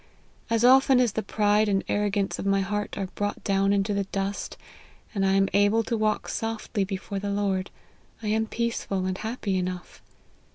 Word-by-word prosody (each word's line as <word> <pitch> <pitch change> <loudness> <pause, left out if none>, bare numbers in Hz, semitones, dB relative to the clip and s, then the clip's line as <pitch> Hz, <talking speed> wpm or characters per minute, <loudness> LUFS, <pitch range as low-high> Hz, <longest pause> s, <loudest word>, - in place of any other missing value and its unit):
As 230 +1 +2
often 265 0 +6
as 245 -3 +3
the 220 - -2
pride 210 0 +2
and 195 -1 +1
arrogance 205 -1 0
of - - -4
my 195 0 +3
heart 205 +2 -3
are 195 -2 -3
brought 205 0 -3
down 195 0 +2
into 200 +1 +1
the 200 -1 0
dust, 195 +1 -3 0.6
and 195 -3 0
1 195 0 +3
am 195 0 +3
able 205 +3 +4
to 230 - -2
walk 215 -1 0
softly 225 -2 -2
before 195 0 -4
the 200 +1 -3
Lord, 200 -2 -1 0.5
I 210 - -1
am 220 +1 +1
peaceful 225 -5 -2
and 185 0 -1
happy 215 -4 -2
enough. 180 -1 -5
205 Hz, 180 wpm, -26 LUFS, 195-220 Hz, 0.6 s, often